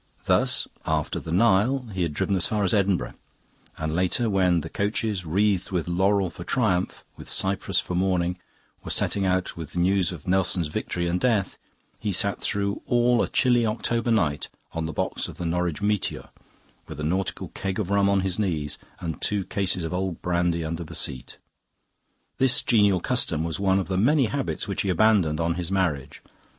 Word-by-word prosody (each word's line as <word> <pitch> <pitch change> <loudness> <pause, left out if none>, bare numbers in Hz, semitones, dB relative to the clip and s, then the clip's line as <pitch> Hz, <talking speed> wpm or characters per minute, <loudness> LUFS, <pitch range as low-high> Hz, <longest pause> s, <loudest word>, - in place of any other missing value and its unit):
Thus, - - +2 0.2
after 80 -1 -1
the 80 - -7
Nile, 115 +7 +3
he 95 - -3
had 85 -3 0
driven 100 - 0
as 90 - +2
far 105 -1 0
as 95 - +2
Edinburgh; 100 -3 +1 0.6
and 80 0 -3
later, 95 +6 +1
when 90 -3 +3
the 80 - -6
coaches, 100 -2 -1
wreathed 100 +2 +1
with 90 -4 -2
laurel 95 +1 +2
for 85 - -9
triumph, 95 -4 0
with - - -6
cypress 95 0 +1
for - - -4
mourning, 90 -1 0 0.4
were - - -7
setting 100 -1 +1
out 95 0 0
with 80 -3 -8
the - - -6
news 95 0 +2
of 85 -5 -9
Nelson's 90 -3 +2
victory 85 +3 -3
and 90 +1 0
death, 105 -4 0 0.4
he 105 - -2
sat 100 +2 +1
through 100 0 -1
all 120 0 +3
a - - +1
chilly 120 -2 +3
October 115 +1 0
night 80 -11 +1 0.2
on 80 -1 -2
the - - -4
box - - -2
of - - -9
the 90 - -4
Norwich 90 +1 -1
'Meteor' 105 -1 -1 0.6
with - - -8
a - - -3
nautical 95 +5 -2
keg 95 -1 -4
of 100 -3 -2
rum 100 0 +3
on 100 -1 +3
his 95 +1 -1
knees 80 -8 -1 0.2
and 80 -2 -5
two 100 -3 0
cases 95 -3 0
of 80 - -4
old 90 -1 -2
brandy 85 -2 0
under 85 +2 -3
the 80 - -7
seat. 65 - -3 1.0
This 130 -2 +4
genial 105 -6 +3
custom 90 -11 0
was 85 +1 -3
one 95 -1 +2
of 95 - -1
the 95 - -1
many 135 +7 +4
habits 135 +1 -2
which 100 - -1
he 100 - -1
abandoned 90 -5 +3
on 85 0 +1
his 90 +1 -4
marriage. 85 -9 -1
95 Hz, 190 wpm, -25 LUFS, 85-100 Hz, 1.0 s, This